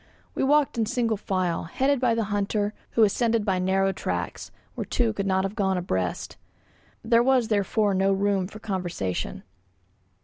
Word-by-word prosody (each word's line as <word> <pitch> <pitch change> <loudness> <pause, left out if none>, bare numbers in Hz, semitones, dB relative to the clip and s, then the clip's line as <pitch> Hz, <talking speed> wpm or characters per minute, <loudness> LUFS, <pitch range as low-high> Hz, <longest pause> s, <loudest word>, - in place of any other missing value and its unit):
We - - -1
walked 285 -3 +3
in 220 - +1
single 230 -1 0
file, 185 -4 -1
headed 270 +11 +1
by 240 -2 +2
the 230 - 0
hunter, 205 +1 0 0.2
who 230 - +4
ascended 225 +1 +2
by 190 -3 +1
narrow 190 +1 +2
tracks, - - -4 0.2
where - - -4
two 230 -3 0
could 200 -2 -2
not 190 0 +2
have 195 +1 -2
gone 190 -3 +1
abreast. 95 - -2 0.7
There 230 +1 +4
was 255 -2 +3
therefore 205 0 +1
no 190 +1 +2
room 195 -1 +1
for 210 - -11
conversation. 180 - -3
205 Hz, 165 wpm, -25 LUFS, 190-230 Hz, 0.7 s, who